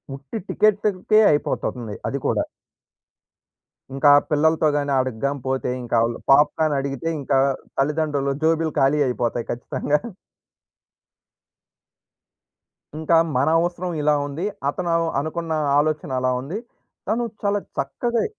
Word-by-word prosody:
ఉట్టి 135 Hz, +9 st, -7 dB
టికెటుకే 210 Hz, 0 st, +2 dB
అయిపోతుంది 120 Hz, -6 st, -2 dB
అది -, -, -2 dB
కూడా. -, -, +1 dB, 1.5 s
ఇంకా 135 Hz, +2 st, +4 dB, 0.2 s
పిల్లలతో 155 Hz, +1 st, +3 dB
గాని, 145 Hz, -1 st, -1 dB
అడకిగాని 130 Hz, +2 st, -2 dB
పోతే 130 Hz, -1 st, -1 dB
ఇంకా 120 Hz, -, -2 dB
ఆళ్ళు 115 Hz, 0 st, -1 dB
పాప్‌కార్న్ 150 Hz, +2 st, +4 dB
అడిగితే 135 Hz, +2 st, -4 dB
ఇంకా 135 Hz, 0 st, +1 dB, 0.4 s
తల్లిదండ్రులు 145 Hz, -1 st, 0 dB
జేబులు 160 Hz, 0 st, +2 dB
ఖాళీ 135 Hz, +2 st, +3 dB
అయిపోతాయి 120 Hz, -1 st, -2 dB
ఖచ్చితంగా. 145 Hz, +4 st, -1 dB, 3.0 s
ఇంకా 160 Hz, +1 st, +2 dB, 0.2 s
మన 140 Hz, +4 st, +2 dB
అవసరం 175 Hz, +1 st, -2 dB
ఇలా 150 Hz, 0 st, +3 dB
ఉంది. 150 Hz, +6 st, -4 dB, 0.2 s
అతను 175 Hz, +4 st, -3 dB
అల్ 165 Hz, 0 st, +1 dB
అనుకున్న 160 Hz, +2 st, -3 dB, 0.3 s
ఆలోచన 150 Hz, -1 st, -1 dB
అలా 130 Hz, 0 st, +1 dB
ఉంది. 150 Hz, +10 st, -5 dB, 0.5 s
తను 225 Hz, +4 st, 0 dB, 0.2 s
చాలా 205 Hz, 0 st, +1 dB, 0.2 s
చక్కగే 235 Hz, -, -1 dB
150 Hz, 110 wpm, -22 LUFS, 135-165 Hz, 3.0 s, ఇంకా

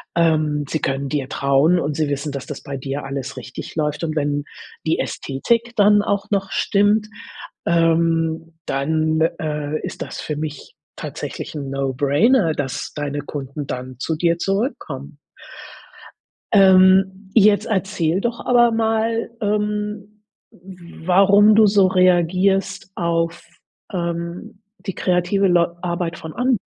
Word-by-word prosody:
ähm, 155 Hz, -3 st, +2 dB
sie 155 Hz, -, -2 dB
können 135 Hz, 0 st, -2 dB
dir 135 Hz, -2 st, -3 dB
trauen 140 Hz, +7 st, +2 dB
und 150 Hz, -3 st, -2 dB
sie 155 Hz, -2 st, 0 dB
wissen, 140 Hz, +1 st, -3 dB
dass 140 Hz, -1 st, -6 dB
das 145 Hz, -, -7 dB
bei 140 Hz, -1 st, -5 dB
dir 135 Hz, +2 st, -5 dB
alles 135 Hz, 0 st, -5 dB
richtig 130 Hz, +1 st, -8 dB
läuft 150 Hz, 0 st, -1 dB
und 155 Hz, -1 st, -2 dB
wenn 145 Hz, -1 st, -1 dB, 0.4 s
die 160 Hz, -, +1 dB
Ästhetik 230 Hz, -, -1 dB
dann 205 Hz, 0 st, +5 dB
auch 200 Hz, -1 st, -2 dB
noch 195 Hz, -1 st, -1 dB
stimmt, 205 Hz, +1 st, +2 dB, 0.6 s
ähm, 165 Hz, -1 st, +1 dB
dann, 155 Hz, +3 st, 0 dB, 0.2 s
äh, 150 Hz, -1 st, -3 dB
ist -, -, -7 dB
das -, -, -6 dB
für 150 Hz, -, -4 dB
mich 150 Hz, -1 st, -6 dB, 0.2 s
tatsächlich -, -, -6 dB
'n 140 Hz, -2 st, -5 dB
No-Brainer, 145 Hz, -, +2 dB
dass 145 Hz, -2 st, -4 dB
deine 145 Hz, -1 st, -3 dB
Kunden 140 Hz, 0 st, -6 dB
dann 130 Hz, 0 st, -6 dB
zu 160 Hz, -, -2 dB
dir 170 Hz, 0 st, +2 dB
zurückkommen. 170 Hz, -, -3 dB, 1.3 s
Ähm, 190 Hz, 0 st, +5 dB
jetzt 210 Hz, -2 st, +5 dB
erzähl 190 Hz, -4 st, 0 dB
doch 235 Hz, +1 st, -3 dB
aber 240 Hz, -1 st, +4 dB
mal, 225 Hz, 0 st, 0 dB
ähm, 210 Hz, 0 st, -2 dB, 0.3 s
warum 190 Hz, +3 st, +2 dB
du 220 Hz, -, +7 dB
so 200 Hz, -2 st, +4 dB
reagierst 185 Hz, +2 st, +2 dB
auf, 170 Hz, -1 st, -1 dB, 0.5 s
ähm, 170 Hz, +5 st, -4 dB, 0.2 s
die 190 Hz, -, -5 dB
kreative 180 Hz, +2 st, +1 dB
Leu 175 Hz, -1 st, +3 dB
Arbeit 170 Hz, -1 st, -3 dB
von 160 Hz, -1 st, -8 dB
anderen, 250 Hz, -1 st, +1 dB
170 Hz, 135 wpm, -20 LUFS, 150-200 Hz, 1.3 s, du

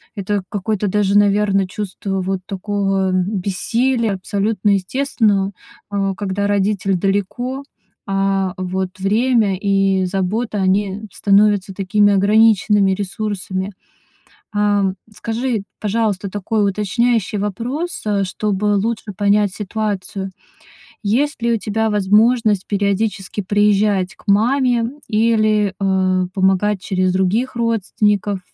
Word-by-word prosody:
Это 200 Hz, -1 st, -2 dB
какое-то 205 Hz, 0 st, -2 dB
даже, 205 Hz, 0 st, +2 dB
наверно, 200 Hz, -1 st, +3 dB
чувство 195 Hz, -1 st, -4 dB
вот 190 Hz, 0 st, -2 dB
такого, 195 Hz, -1 st, -1 dB
м, 185 Hz, -1 st, +2 dB, 0.2 s
бессилия- 230 Hz, +4 st, 0 dB
абсолютно 205 Hz, +1 st, 0 dB
естественно, 200 Hz, -1 st, +1 dB, 0.4 s
а, 195 Hz, -1 st, -1 dB
когда 200 Hz, 0 st, -2 dB
родитель 200 Hz, -1 st, +1 dB
далеко. 205 Hz, +8 st, -2 dB, 0.4 s
А, 195 Hz, -1 st, 0 dB
вот 185 Hz, 0 st, -2 dB
время 215 Hz, 0 st, +2 dB
и 195 Hz, -1 st, +1 dB
забота- 205 Hz, +4 st, -2 dB
они 195 Hz, +2 st, 0 dB
становятся 200 Hz, -1 st, +2 dB
такими 205 Hz, +2 st, +2 dB
ограниченными 210 Hz, 0 st, +4 dB
ресурсами. 195 Hz, -1 st, -4 dB, 0.8 s
A, 205 Hz, -2 st, +2 dB, 0.2 s
скажи, 225 Hz, -1 st, -2 dB, 0.2 s
пожалуйста, 210 Hz, -2 st, -1 dB
такой 205 Hz, +1 st, 0 dB
уточняющий 210 Hz, +1 st, 0 dB
вопрос, 240 Hz, -, -3 dB
э, 200 Hz, -2 st, +1 dB
чтобы 205 Hz, +2 st, -1 dB
лучше 215 Hz, 0 st, -2 dB
понять 205 Hz, -1 st, +2 dB
ситуацию. 200 Hz, -2 st, -4 dB, 0.7 s
Есть 255 Hz, +8 st, 0 dB
ли 235 Hz, -, +2 dB
у 230 Hz, -, +2 dB
тебя 220 Hz, +2 st, -1 dB
возможность 210 Hz, +1 st, +3 dB
периодически 200 Hz, 0 st, -1 dB
приезжать 205 Hz, -1 st, +2 dB
к -, -, -22 dB
маме 240 Hz, +3 st, +2 dB, 0.2 s
или, 215 Hz, -2 st, +2 dB
э, 185 Hz, -1 st, +1 dB
помогать 190 Hz, +1 st, +1 dB
через 185 Hz, -1 st, 0 dB
других 210 Hz, +8 st, 0 dB
родственников? 210 Hz, -3 st, 0 dB
205 Hz, 105 wpm, -19 LUFS, 195-215 Hz, 0.8 s, ограниченными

